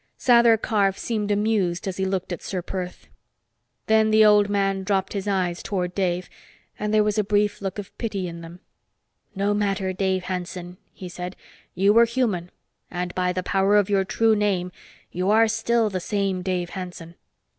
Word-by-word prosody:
Sather 235 -2 +5
Karf 200 -3 +1
seemed 215 -3 -2
amused 205 -4 0
as 185 - -3
he 190 - 0
looked 190 -1 -2
at 175 - -6
Ser 185 -3 -4
Perth. 180 0 -6 0.8
Then 220 0 +3
the 215 0 +6
old 210 -1 +5
man 195 -1 0
dropped 190 -1 -1
his 200 0 -4
eyes 185 -3 0
toward 180 -3 -3
Dave, 180 -2 -1 0.5
and 210 0 -2
there 215 0 +4
was 210 0 0
a - - +2
brief 205 0 0
look 195 0 -4
of 205 -2 -8
pity 200 -5 -3
in 170 -1 -8
them. 170 +2 -11 0.7
"No 200 +1 +1
matter, 195 -2 -1
Dave 190 0 0
Hanson," 180 -1 -5
he 185 - -9
said. 180 +1 -7 0.4
"You 195 +3 +4
were 230 +1 +6
human, 225 -8 -1 0.4
and 180 0 -4
by 180 0 0
the 185 0 -3
power 195 +2 +2
of 205 -1 +2
your 195 -1 +3
true 225 +3 +2
name, 195 -4 0 0.4
you 180 +2 -1
are 225 +2 +5
still 225 +1 +1
the 185 - -2
same 195 0 -1
Dave 180 -1 -2
Hanson. 180 -3 -7
195 Hz, 180 wpm, -24 LUFS, 180-210 Hz, 0.8 s, the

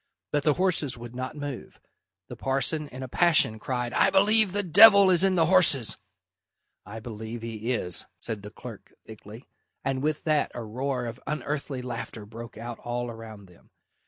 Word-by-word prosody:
But 145 - +1
the 145 +1 +2
horses 175 -8 0
would 120 0 -10
not 130 +2 -5
move. 145 -4 -7 0.5
The - - -9
parson, 135 +3 -1
in 130 -1 -9
a - - -6
passion, 155 -7 +3
cried, 125 +1 -3
"I - - +4
believe 200 +1 +4
the 205 +2 -1
devil 200 +2 +8
is 180 0 +4
in 190 -1 +3
the 165 -2 +3
horses!" 160 - +4 0.9
"I 110 +3 -8
believe 110 +1 -8
he 115 +1 -4
is," 90 -8 -1
said 110 -3 -3
the 105 - -9
clerk - - -12
thickly, 110 +2 -12 0.4
and 135 -1 -1
with 155 +1 -2
that 155 -2 +1
a 120 - -5
roar 125 +3 -3
of 115 +1 -7
unearthly 145 -2 -4
laughter 120 -3 -6
broke 115 +2 -10
out 120 +1 -7
all 120 0 -4
around 110 -3 -11
them. 90 -2 -22
130 Hz, 175 wpm, -26 LUFS, 115-155 Hz, 0.9 s, devil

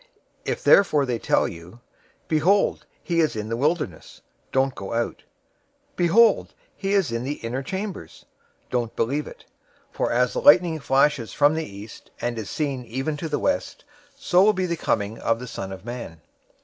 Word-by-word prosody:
024:026 - - -1
If - - -10
therefore 150 -8 +5
they 120 -3 -2
tell - - +2
you, 85 +7 -11 0.5
'Behold, 175 +6 +2 0.2
he 170 -1 0
is 155 -6 +2
in 105 0 -4
the 115 - -1
wilderness,' 145 - -2 0.3
don't 135 0 +1
go 100 0 -7
out; 115 0 -2 0.7
'Behold, 205 +6 +3 0.2
he 195 0 -2
is 190 -10 +2
in 115 +1 -2
the 140 +3 -2
inner 125 +3 -2
chambers,' 190 +6 -6 0.5
don't 120 -2 -1
believe 140 +6 -1
it. - - -12 0.5
024:027 - - -29
For - - 0
as 125 +1 +2
the - - -2
lightning 165 +1 +6
flashes 135 -3 +1
from 145 +1 +4
the 160 0 -2
east, 100 +2 -11
and 120 -1 -2
is 105 - -6
seen 140 -4 -2
even 135 +6 -3
to 160 +1 -5
the 150 - 0
west, 285 0 -2 0.3
so 205 -10 +3
will 215 +1 +5
be 185 -1 -1
the 170 -1 -1
coming 110 -8 -1
of 115 - +1
the 125 - -7
Son 95 -5 -6
of 95 +1 -9
Man. 120 -9 -7
135 Hz, 185 wpm, -24 LUFS, 115-170 Hz, 0.7 s, lightning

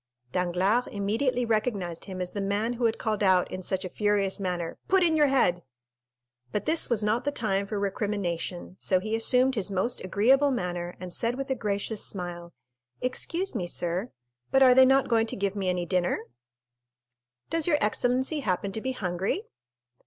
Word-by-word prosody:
Danglars 180 - +1
immediately 230 +5 0
recognized 215 -7 -1
him 185 -2 -6
as 180 - -2
the 205 - -3
man 205 +4 0
who 240 0 -1
had 225 -1 +1
called 215 -2 -2
out 185 -2 +3
in 185 - -5
such 190 +1 -2
a - - -2
furious 205 +1 0
manner, 180 -3 -3
"Put 380 -1 +4
in 330 -2 +3
your 300 -2 +5
head!" 180 -10 +2 0.9
But 210 - -2
this 320 +1 +2
was 225 -3 +1
not 220 +4 +1
the 285 - 0
time 200 -6 -1
for 210 - -3
recrimination, 195 -4 -3
so 185 - +2
he 215 +4 -2
assumed 250 +3 +3
his 210 -5 -1
most 200 +5 -1
agreeable 250 +10 +3
manner 175 -7 -3
and 180 -1 -7
said 235 +1 0
with 270 +1 -4
a - - +2
gracious 210 -1 -2
smile: 175 -2 -5 0.5
"Excuse 335 +9 -2
me, 190 -8 -2
sir, 175 +6 -2 0.4
but 270 0 +5
are 255 -1 +8
they 260 +1 +7
not 270 +1 +4
going 225 -1 +2
to - - -2
give 200 0 -1
me 195 -2 -1
any 180 -1 -1
dinner?" 180 0 0 1.3
"Does 330 -1 0
your 305 -4 +4
excellency 255 +6 +1
happen 195 -5 -1
to 220 - -4
be 260 +2 -2
hungry?" 190 - -2
210 Hz, 180 wpm, -27 LUFS, 185-250 Hz, 1.3 s, are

